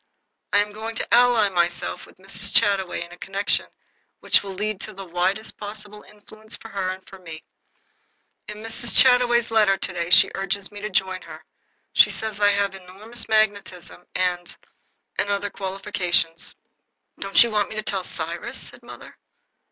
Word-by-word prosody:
I - - +3
am 210 - -10
going 220 +2 -6
to - - -3
ally 240 -3 +5
myself 175 -2 -2
with - - -19
Mrs. 195 +1 -1
Chataway 195 -5 +2
in 170 - -17
a 175 - -13
connection 195 +1 0 0.5
which - - +4
will 195 -1 -7
lead 210 0 -3
to 215 - -7
the 195 0 -9
widest 185 +5 -1
possible 210 0 -8
influence 215 +1 -12
for 225 - -12
her 195 -3 -2
and 185 0 -7
for 190 - -13
me. 165 -3 -9 1.0
In 210 +1 -8
Mrs. 225 +1 +3
Chataway's 245 -2 +5
letter 210 -3 +4
to 190 - -3
day 170 -1 -3
she 180 - +6
urges 195 0 -3
me 205 0 -9
to 210 - -4
join 190 -1 0
her. - - -12 0.5
She - - +6
says 220 -2 -3
I 205 0 +5
have 200 -1 +1
enormous 200 +6 -5
magnetism 200 -5 -1
and 180 -1 -1 0.6
and 205 - 0
other 200 0 -1
qualifications." 185 -4 -1 0.6
"Don't 195 +3 +5
you 235 - -2
want 210 -1 0
me - - -6
to 215 - -3
tell 195 -3 -2
Cyrus?" 170 0 -5
said - - -8
mother. - - -13
200 Hz, 170 wpm, -23 LUFS, 185-215 Hz, 1.0 s, she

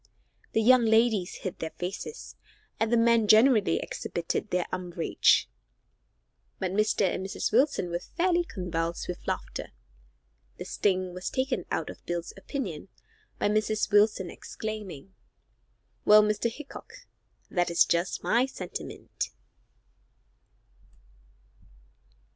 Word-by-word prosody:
The 225 - +2
young 250 +1 +6
ladies 220 -4 +3
hid 185 - -4
their 160 - -3
faces, 195 - -6 0.4
and 225 0 +1
the 235 - +4
men 230 -1 +4
generally 220 0 +5
exhibited 170 +5 -3
their 180 -1 0
umbrage, 180 -2 +2 1.1
but 185 -2 -2
Mr. 210 +1 +2
and 185 0 -1
Mrs. 190 - -2
Wilson 240 - +2
were 175 - -1
fairly 350 - 0
convulsed 170 - -3
with 180 - -6
laughter. - - -4 0.9
The - - -6
sting 185 -2 0
was 180 +1 -4
taken 260 0 -1
out - - -2
of - - -15
Bill's 175 -1 -3
opinion 200 - -5 0.5
by - - +1
Mrs. 215 0 0
Wilson 205 -3 +3
exclaiming, 195 -6 -7 0.9
"Well, 210 0 +7
Mr. 210 +2 +1
Hickok, 285 +4 -10 0.6
that 175 -2 +1
is 170 - +5
just 170 +2 -1
my 245 +3 +3
sentiment." 185 -9 -6
205 Hz, 115 wpm, -28 LUFS, 180-230 Hz, 1.1 s, Well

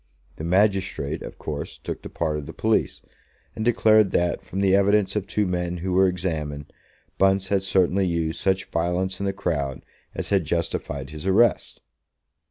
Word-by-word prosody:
The - - -6
magistrate, 90 -5 +1
of - - -8
course, 75 -2 -5
took - - -6
the - - -8
part 80 -2 -2
of 75 - -8
the 80 - -8
police, 110 0 0 0.5
and 110 - -3
declared 110 -3 +4
that, 85 0 +1
from 95 - -4
the 95 -1 +4
evidence 100 0 +3
of 105 -2 -2
two 105 - 0
men 90 -1 -2
who 90 +2 -3
were 95 +1 +5
examined, 80 -6 -3 0.5
Bunce 95 0 +3
had 100 -1 +2
certainly 95 0 +2
used 85 -2 -1
such 95 -1 +1
violence 90 +3 -1
in 100 - -1
the - - +1
crowd 80 -9 -3 0.3
as - - -4
had 100 -3 +2
justified 75 -3 -3
his 75 +4 -7
arrest. 110 +4 +2
95 Hz, 175 wpm, -24 LUFS, 80-100 Hz, 0.5 s, were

